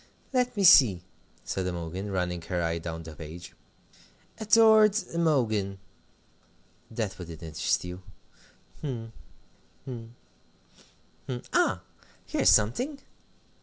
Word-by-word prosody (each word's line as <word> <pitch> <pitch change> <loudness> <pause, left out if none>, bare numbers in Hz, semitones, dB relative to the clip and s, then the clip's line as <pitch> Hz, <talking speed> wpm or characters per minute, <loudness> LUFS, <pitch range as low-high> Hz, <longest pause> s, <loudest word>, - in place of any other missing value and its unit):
"Let 250 -3 0
me 200 - +1
see," 120 - +7 0.4
said 95 -1 -3
Imogen, 90 +3 -5
running 90 -2 -2
her 90 +1 -3
eye 85 0 -1
down 80 0 -6
the 80 -1 -10
page. 85 +2 -10 0.9
"'Adored 220 -1 +5 0.2
Imogen' 115 -12 +1 1.1
that 110 -4 -4
wouldn't 85 -2 -9
interest 80 +2 -1
you 90 +1 -7 0.8
hm, 115 -6 -5 0.7
hm, 115 -2 -8 1.1
hm 130 - -3 0.2
ah, - - +2 0.4
here's - - +2
something! 245 - +2
100 Hz, 100 wpm, -28 LUFS, -, 1.1 s, see